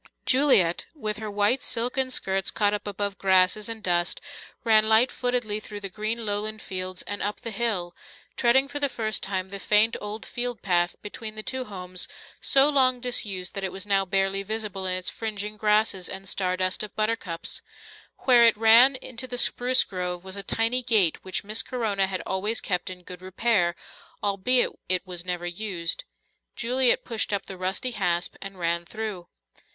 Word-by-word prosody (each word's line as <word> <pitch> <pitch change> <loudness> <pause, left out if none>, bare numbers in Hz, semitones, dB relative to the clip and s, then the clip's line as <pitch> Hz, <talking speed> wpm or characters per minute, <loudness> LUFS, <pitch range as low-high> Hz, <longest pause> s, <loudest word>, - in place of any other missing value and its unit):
Juliet, 255 - +5
with 215 -7 -4
her 215 0 -6
white 205 +6 +1
silken 250 +2 -1
skirts 195 -6 +1
caught 205 -1 +1
up 210 - -4
above 200 0 -4
grasses 190 +3 +3
and 225 -1 -5
dust, 175 -2 0 0.4
ran 220 -2 +4
light 225 +4 +5
footedly 245 -4 -1
through 210 -1 -8
the 195 - -4
green 220 +3 -3
lowland 210 +1 -2
fields 185 -2 -5
and 205 0 -4
up 205 +1 -2
the 230 - -4
hill, 200 -6 -2 0.4
treading 265 +3 +3
for 290 - -6
the 285 -1 0
first 220 -4 -2
time 190 -1 -3
the 200 - -5
faint 210 +3 +4
old 210 +1 -6
field 240 -3 -4
path 175 -2 +1
between 215 +1 -7
the 215 - -4
two 260 +2 -4
homes, 185 -3 -3 0.3
so 275 +1 +5
long 260 -4 +3
disused 205 -7 -1
that 195 -1 -4
it 190 - -2
was 190 +1 -5
now 195 -1 +2
barely 195 +1 0
visible 205 -2 -3
in 185 0 0
its 185 - -4
fringing 210 -1 -3
grasses 210 -3 +1
and 195 0 -6
star 185 -1 -1
dust 185 0 0
of 215 - -7
buttercups. 215 -6 -2 0.6
Where 245 -3 +6
it 230 - +5
ran 230 +5 +7
into 255 0 -5
the 245 - -3
spruce 250 +1 +4
grove 180 -1 -5
was 190 0 -7
a 200 - -4
tiny 225 +5 +1
gate 215 -9 +2
which 185 +2 -3
Miss 215 +2 +1
Corona 210 -6 -1
had 185 -2 -3
always 205 +4 0
kept 180 0 -2
in 180 -1 -9
good 180 0 -10
repair, 185 -2 0 0.5
albeit 205 +5 +2 0.2
it 185 0 +2
was 180 -2 -5
never 180 -1 -3
used. 175 -2 -2 0.5
Juliet 250 +1 +3
pushed 230 -3 -1
up 200 -1 -1
the 190 - -7
rusty 190 +7 -2
hasp 180 -5 -1
and 195 -1 -7
ran 170 0 -1
through. 205 -2 -6
205 Hz, 180 wpm, -25 LUFS, 185-230 Hz, 0.6 s, ran